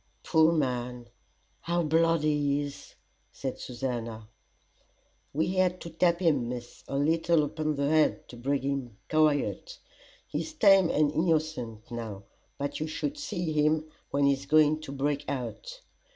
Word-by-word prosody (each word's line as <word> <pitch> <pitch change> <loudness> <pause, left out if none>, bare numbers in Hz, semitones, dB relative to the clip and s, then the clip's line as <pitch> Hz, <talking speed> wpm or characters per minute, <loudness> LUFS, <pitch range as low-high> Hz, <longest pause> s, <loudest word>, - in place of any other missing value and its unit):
"Poor 160 0 +4
man, 125 -5 -1 0.5
how 175 0 0
bloody 160 -1 +3
he 145 -1 +1
is!" 145 -1 -9 0.4
said 130 -2 -5
Susannah. 115 -3 -5 1.0
"We 160 +4 0
had 185 -1 +1
to 170 - -7
tap 170 +2 +2
him, 145 -9 +2
Miss, 120 -1 -7
a 135 - -2
leetle 165 +2 +3
upon 155 0 -2
the 140 0 0
head, 155 +1 +2
to - - -10
bring 135 +3 -1
him 135 -6 -3
quiet. 155 - +1 0.5
He's 315 - -4
tame 195 - +6
and 150 -1 +2
innocent 155 -10 -1
now, 110 -4 -6 0.3
but 140 0 -3
you 155 - -2
should 280 - -3
see 175 - -3
him 155 +1 +1 0.2
when 140 0 +2
he's 140 0 +1
going 155 +1 +4
to 155 - -7
break 140 +1 -1
out. 145 - -5
150 Hz, 145 wpm, -28 LUFS, 135-165 Hz, 1.0 s, tame